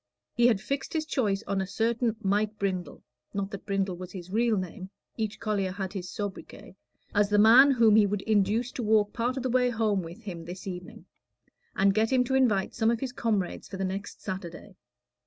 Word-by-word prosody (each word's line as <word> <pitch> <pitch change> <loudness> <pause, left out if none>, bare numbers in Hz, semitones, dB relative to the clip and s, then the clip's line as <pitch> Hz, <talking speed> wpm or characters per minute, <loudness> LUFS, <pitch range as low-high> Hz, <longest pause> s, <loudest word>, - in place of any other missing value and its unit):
He 240 0 +4
had 225 -5 +3
fixed 270 +6 -4
his 315 -1 -1
choice 215 -9 0
on 195 -1 -1
a 190 - -3
certain 230 +2 0
Mike 210 +2 0
Brindle 185 -3 -3 0.3
(not 200 0 -2
that 200 0 -8
Brindle 195 -2 -1
was 180 0 -8
his 185 -1 -9
real 225 +1 +2
name 185 +1 -5 0.3
each 220 -2 -3
collier 205 -4 -1
had 190 0 -5
his 185 -3 -5
sobriquet) 205 -2 -7 0.4
as 205 -1 +3
the 210 - +3
man 235 +7 +8
whom 230 -5 +5
he 210 -2 +5
would 200 0 -2
induce 220 +3 +1
to - - -5
walk 215 -2 +2
part 245 +2 -1
of 260 - -3
the 260 - -1
way 250 0 +3
home 215 -4 +1
with 170 +6 -10
him 175 -5 -6
this 175 +2 -8
very 185 -2 -4
evening, 180 - -13 0.7
and 195 0 +3
get 220 +2 +2
to 255 0 +2
invite 225 -8 +2
some 225 -1 +1
of 235 -1 +1
his 260 -1 -3
comrades 220 -6 -2
for 195 - -7
the 190 - -1
next 195 +2 -5
Saturday. 185 0 -7
205 Hz, 210 wpm, -28 LUFS, 190-230 Hz, 0.7 s, man